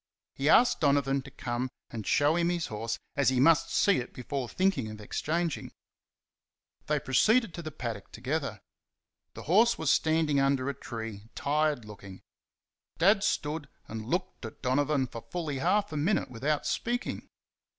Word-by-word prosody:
He 140 +2 0
asked 245 +8 +5
Donovan 140 -2 +2
to 140 - -11
come 125 0 -3 0.2
and 110 -3 -6
show 150 +2 +3
him 170 0 +2
his 175 -3 -1
horse, 115 +2 -3 0.2
as 140 -2 +3
he 130 -1 +1
must 165 +4 +5
see 200 - +3
it 125 -1 -5
before 125 0 -4
thinking 185 - 0
of 110 0 -8
exchanging. 160 +9 -2 1.2
They 150 0 +1
proceeded 210 - +3
to 170 - -6
the 155 - -5
paddock 115 -8 -6
together. - - -3 0.7
The - - -8
horse 225 +8 +4
was 160 -3 +1
standing 155 -3 +2
under 135 -1 +2
a - - -1
tree, 115 -5 -7
tired 150 -4 0
looking. 100 -3 -11 0.7
Dad 195 +5 +4
stood 150 -4 -1 0.2
and 110 0 -6
looked 180 +3 -2
at 110 - -9
Donovan 140 +2 +2
for 115 -2 -8
fully 155 -6 -3
half 205 +9 +1
a 155 - -3
minute 165 +3 0
without 140 +5 -1
speaking. 240 +1 -2
145 Hz, 160 wpm, -29 LUFS, 125-165 Hz, 1.2 s, asked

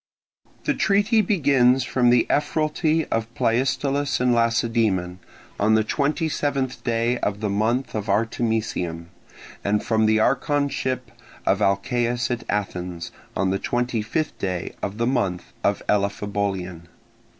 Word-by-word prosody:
The - - +1
treaty 205 +2 +3
begins 135 - +3
from 125 0 +2
the 120 -1 +4
ephoralty 155 +1 +1
of 115 0 -1
Pleistolas 135 +3 +1
in 125 0 +3
Lacedaemon, 115 -6 +1 0.4
on 110 +2 +4
the 110 - +3
27th 145 -1 -1
day 120 +1 0
of 105 0 -2
the 105 -2 -1
month 115 +6 0
of 105 -2 -3
Artemisium, 110 -7 -1 0.5
and 105 +1 +1
from 110 -1 +2
the 110 0 +4
archonship, 130 0 0 0.3
of 95 +2 +2
Alcaeus 120 +5 +1
at 120 -1 -2
Athens, 90 -4 -3 0.2
on 95 -1 +1
the 95 - 0
25th 120 +5 -1
day 90 -2 -3
of 100 +1 -4
the 115 - +1
month 110 -9 -1
of - - +1
Elaphebolion. 100 -4 -1
115 Hz, 125 wpm, -23 LUFS, 100-130 Hz, 0.5 s, the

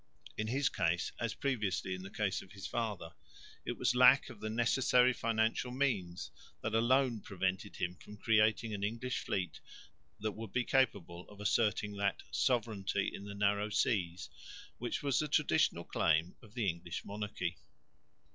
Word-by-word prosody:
In 110 - -2
his 135 +4 +1
case, 85 +1 0
as 115 -2 -2
previously 105 -8 -1
in 90 - -5
the 95 - -8
case 100 -2 -1
of 95 - -14
his 100 -2 -8
father, 105 -7 -3 0.5
it - - -3
was - - +2
lack 125 +1 +6
of 115 - -12
the 110 - -4
necessary 125 +2 +4
financial 115 +1 0
means 90 - -1 0.3
that 110 - -2
alone 120 0 +3
prevented 95 +1 -2
him 90 0 -2
from 105 +1 -12
creating 110 +1 +2
an 100 -1 -3
English 115 +4 -2
fleet 90 -5 -2 0.6
that 110 +1 -1
would 110 -1 -8
be 125 - +1
capable 100 -10 0
of 105 - -14
asserting 105 -1 +1
that 100 -1 0
"sovereignty 105 -5 0
in 100 - -7
the 100 0 -7
narrow 100 +1 +1
seas," 95 -6 0 0.5
which 120 +3 -3
was 140 -3 +2
the 150 - 0
traditional 150 +1 +2
claim 85 +2 +1
of 110 -1 -17
the 115 -5 0
English 85 -1 -3
monarchy. 100 -4 -4
105 Hz, 160 wpm, -34 LUFS, 95-120 Hz, 0.6 s, lack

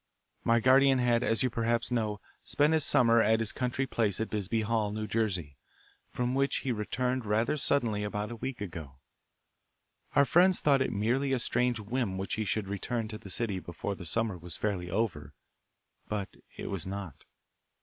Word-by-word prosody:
My 115 0 +4
guardian 135 +3 +5
had, 120 -1 +2
as 115 +2 +1
you 130 - +1
perhaps 115 +1 0
know, 110 -4 -1 0.2
spent 150 +2 +2
his 160 -2 +3
summer 115 -5 +5
at 110 +1 +3
his 110 -2 +1
country 125 +1 -1
place 110 -7 0
at 110 - -3
Bisbee 110 +2 -1
Hall, 110 -1 0
New 110 +1 -3
Jersey, 95 -10 -2 0.5
from 125 0 -2
which 135 +1 +1
he 130 - -1
returned 125 +3 -1
rather 110 +6 +1
suddenly 120 -8 +1
about 105 +1 -3
a - - -5
week 120 +1 -5
ago. 85 -8 -7 1.2
Our 140 - +6
friends 180 +5 +4
thought 140 -2 +3
it 130 - 0
merely 125 +7 0
a - - +2
strange 125 0 0
whim 105 -2 -2
that 95 +1 -3
he 110 - -1
should 105 0 -1
return 110 +3 -3
to 110 -1 -7
the 105 -3 -11
city 100 -1 -1
before 85 +3 -5
the 95 - -9
summer 110 0 0
was 85 +1 -7
fairly 95 -4 -2
over, 95 -6 -2 0.7
but 105 -2 -2 0.3
it - - -5
was 95 -3 -4
not. 100 -2 -6
115 Hz, 180 wpm, -30 LUFS, 100-125 Hz, 1.2 s, Our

